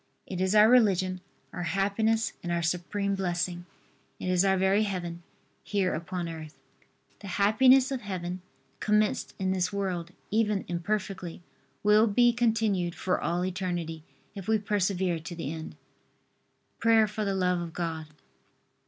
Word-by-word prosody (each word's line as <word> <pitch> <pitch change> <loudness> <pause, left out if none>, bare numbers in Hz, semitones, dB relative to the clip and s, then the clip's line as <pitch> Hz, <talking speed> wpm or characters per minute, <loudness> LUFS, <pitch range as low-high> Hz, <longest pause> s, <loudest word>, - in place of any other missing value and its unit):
It 185 -1 -4
is 190 +2 +1
our 210 +1 +8
religion, 190 -6 +3 0.3
our 180 - -4
happiness 205 +6 +1
and 175 - -4
our 170 0 0
supreme 185 +4 -1
blessing. 175 -2 -2 0.5
It 185 - -3
is 180 0 +3
our 190 -1 +3
very 190 +2 +3
Heaven, 175 -5 -3 0.4
here 195 -3 0
upon 170 +2 -4
earth. 160 -2 -8 0.6
The 200 - -9
happiness 255 +6 +5
of 265 -2 -2
Heaven, 185 -2 -4 0.4
commenced 210 0 +1
in 190 -1 0
this 185 0 0
world 185 -4 -2 0.2
even 210 -2 +1
imperfectly, 185 -1 -3 0.4
will 210 +2 +5
be 240 +3 +4
continued 220 -7 +1
for 185 - -1
all 175 +2 0
eternity, 175 -3 -3 0.3
if 195 -3 -8
we 220 0 +3
persevere 190 -4 0
to 170 +2 -8
the 165 -3 -4
end. 160 -1 -7 1.0
PRAYER 225 -1 +5
FOR 210 +1 -4
THE 195 -1 -1
LOVE 180 -2 +1
OF 170 -1 -6
GOD. 160 -2 -3
190 Hz, 145 wpm, -28 LUFS, 175-210 Hz, 1.0 s, our